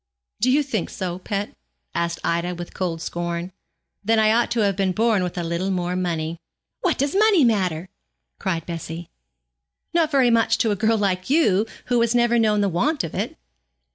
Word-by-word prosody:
'Do 255 - +2
you 290 +3 +4
think 225 -10 -2
so, 180 -1 -4
pet?' 200 +2 -4 0.4
asked 170 0 -1
Ida, 170 +1 -1
with 175 0 -8
cold 170 -3 -3
scorn; 170 +1 -3 0.5
'then 225 +2 +2
I 215 0 +4
ought 235 +2 +2
to 235 - 0
have 200 -2 +2
been 190 -1 0
born 220 -1 +2
with 180 0 -3
a 175 - -1
little 170 +3 -2
more 180 -1 -1
money.' 165 -2 -2 0.4
'What 360 -4 0
does 280 +2 0
money 410 -6 +5
matter?' 185 -7 +1 0.5
cried 165 -3 -2
Bessie. 165 0 -6 0.8
'Not 335 -2 +3
very 265 -5 +3
much 230 -1 +3
to 225 - +1
a - - +1
girl 220 +3 +2
like 185 -2 -1
you, 225 - +3 0.2
who 245 -1 +2
has 235 +1 +2
never 240 0 +3
known 210 -2 +3
the 200 - +2
want 255 - 0
of 165 - -5
it.' - - -3
195 Hz, 190 wpm, -23 LUFS, 175-235 Hz, 0.8 s, money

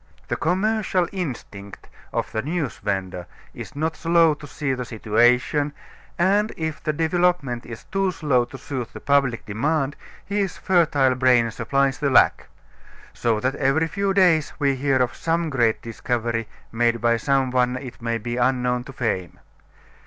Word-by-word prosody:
The - - 0
commercial 190 0 +1
instinct 120 - -6 0.2
of - - -2
the 110 - -1
news 155 -1 -3
vender 95 -3 -3 0.3
is - - -9
not 160 +2 -1
slow 165 -1 +4
to 145 0 -10
see 145 -1 -2
the 125 -1 -3
situation, 125 +6 +2 0.4
and 200 +5 +2
if 160 -2 -3
the 155 - 0
development 160 -5 0
is 115 -2 -8
too 195 0 0
slow 140 -8 +1
to 135 +2 -10
suit 130 -3 -5
the - - -8
public 140 -4 +1
demand 140 +6 -1 0.3
his 200 -3 -2
fertile 150 -8 +3
brain 125 -2 +3
supplies 135 +4 0
the 145 -2 +1
lack. 130 - +4 0.7
So 115 -2 0
that 130 +1 0
every 145 +4 +2
few 200 +4 -1
days 180 -6 +3
we 140 -2 +2
hear 135 0 +1
of 125 -2 +1
some 165 -1 -1
great 120 -5 +1
discovery 115 -1 -2 0.2
made 115 0 +1
by 115 +1 +2
some 135 0 +1
one 125 0 +2
it 125 -3 -9
may 115 0 -1
be 120 +2 -4
unknown 125 -1 +1
to 135 - -10
fame. 95 -8 -2
135 Hz, 160 wpm, -23 LUFS, 120-160 Hz, 0.7 s, slow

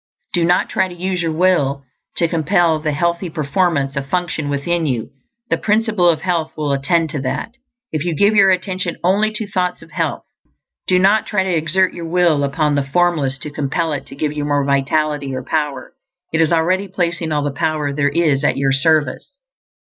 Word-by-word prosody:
Do 175 - +2
not 175 +2 +2
try - - 0
to 180 - -10
use 180 +1 -2
your 165 -1 -1
will 155 -5 +1 0.3
to 170 - +2
compel 165 0 +2
the 155 0 -1
healthy 170 +4 -1
performance 150 -2 0
of 140 0 -4
function 175 -4 -1
within 160 +4 -1
you. 120 -5 -2 0.4
The - - +2
Principle 215 -4 +2
of 160 -2 +1
Health 165 -3 -1
will 150 -2 -1
attend 160 +3 +1
to 150 -4 -3
that, 135 - -3 0.4
if 155 -2 -2
you 170 -2 -1
give 205 +6 +3
your 200 -2 +6
attention 185 -2 -1
only 200 +4 +3
to 215 0 -2
thoughts 180 -2 -2
of - - -17
health. - - -2 0.6
Do 185 - +4
not 195 +4 +3
try 200 -3 +1
to 185 -2 0
exert 165 +4 +1
your 170 - -6
will 170 -4 +2
upon 145 +2 0
the 140 -1 +1
Formless 145 -2 +1
to 150 - -6
compel 150 +3 -1
It 145 - -5
to - - -10
give 150 +1 -2
you 150 -1 -3
more 145 -1 +1
vitality 140 0 0
or 130 - -4
power; 145 -3 -3 0.4
it 165 - +2
is 160 - +2
already 180 +4 +1
placing 170 -3 -2
all 150 -1 0
the 145 - -1
power 150 0 -1
there 145 0 +1
is 145 -2 +1
at - - +2
your 135 0 +1
service. 155 - +1
160 Hz, 200 wpm, -18 LUFS, 145-180 Hz, 0.6 s, your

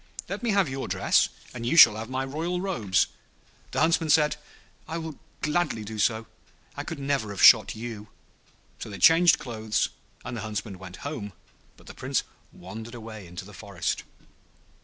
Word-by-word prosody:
Let - - -5
me 240 - -1
have 200 -4 +3
your 135 0 -4
dress, - - +2 0.2
and 120 -2 -6
you 145 +8 0
shall 115 -9 +10
have 110 +2 -6
my 130 +1 -2
royal 165 +6 -2
robes.' 110 - +1 0.6
The - - -1
Huntsman 160 0 +2
said, 150 0 +4 0.5
'I 165 - -4
will 160 -3 -6 0.2
gladly 150 -7 0
do 110 +1 -7
so; 110 +1 +1 0.5
I - - -4
could 165 - -6
never 140 -5 -1
have 100 -2 -3
shot - - +8
you.' 110 -2 -7 0.7
So - - -6
they 100 - -7
changed 165 - +6
clothes, 110 -3 -1 0.4
and 120 - -5
the 115 - -4
Huntsman 105 -2 -5
went 95 +2 -10
home, 105 -9 -5 0.4
but - - -19
the - - -10
Prince - - -1 0.3
wandered 110 +6 -9
away 110 -4 -9
into 90 +2 -8
the 105 - -13
forest. 90 -2 -3
115 Hz, 175 wpm, -26 LUFS, 105-155 Hz, 0.7 s, shall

